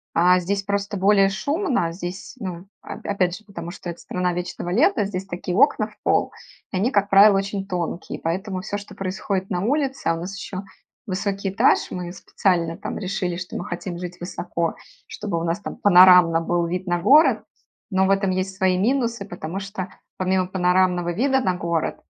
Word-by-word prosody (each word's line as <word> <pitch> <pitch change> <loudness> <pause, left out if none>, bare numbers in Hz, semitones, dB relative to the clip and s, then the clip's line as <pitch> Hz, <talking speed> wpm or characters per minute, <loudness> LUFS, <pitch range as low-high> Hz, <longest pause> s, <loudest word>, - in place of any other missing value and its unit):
а, 180 +2 +5
здесь 195 +3 -2
просто 200 +1 -2
более 195 0 +4
шумно, 280 - -1
здесь, 180 +6 -7
ну, 180 -5 -5 0.2
оп - - -9
опять 185 -3 0
же, 215 - -18
потому 195 -5 -7
что 175 -1 -6
это - - -12
страна 180 -1 -2
вечного 175 0 -4
лета, 235 - +3
здесь 195 -1 -4
такие 180 0 -4
окна 270 - +4
в - - -19
пол, - - +1 0.4
и - - -4
они, 210 +6 +2
как 200 -6 +2
правило, 200 0 +7
очень 195 0 -3
тонкие, 175 -2 -4
поэтому 185 +3 -3
всё, 205 0 -4
что 205 - -12
происходит 190 0 -3
на 180 -1 0
улице, 270 +3 -1
а 165 - +3
у - - -5
нас 185 +4 -6
ещё 195 0 -6 0.4
высокий 195 0 -2
этаж. 195 - +3
Мы 175 -1 -5
специально 170 -2 0
там - - -5
решили, 185 -2 -2
что 180 0 -6
мы 175 - -5
хотим 175 0 -5
жить 180 0 -7
высоко, 170 -1 -3 0.3
чтобы 200 -5 -3
у 165 - -4
нас 170 +3 -1
там - - -7
панорамно 180 -3 +7
был 175 +1 0
вид 180 +2 -3
на 175 0 +1
город, 290 - +5 0.5
но 190 0 +2
в 195 - +2
этом 195 -1 +2
есть 185 +1 -2
свои 190 -2 +2
минусы. 235 0 0
Потому 175 0 -6
что, 195 -1 -6 0.3
помимо 185 0 +1
панорамного 180 -1 +2
вида 265 +8 +2
на 185 -6 0
город, 170 -2 -1
185 Hz, 190 wpm, -23 LUFS, 175-200 Hz, 0.5 s, правило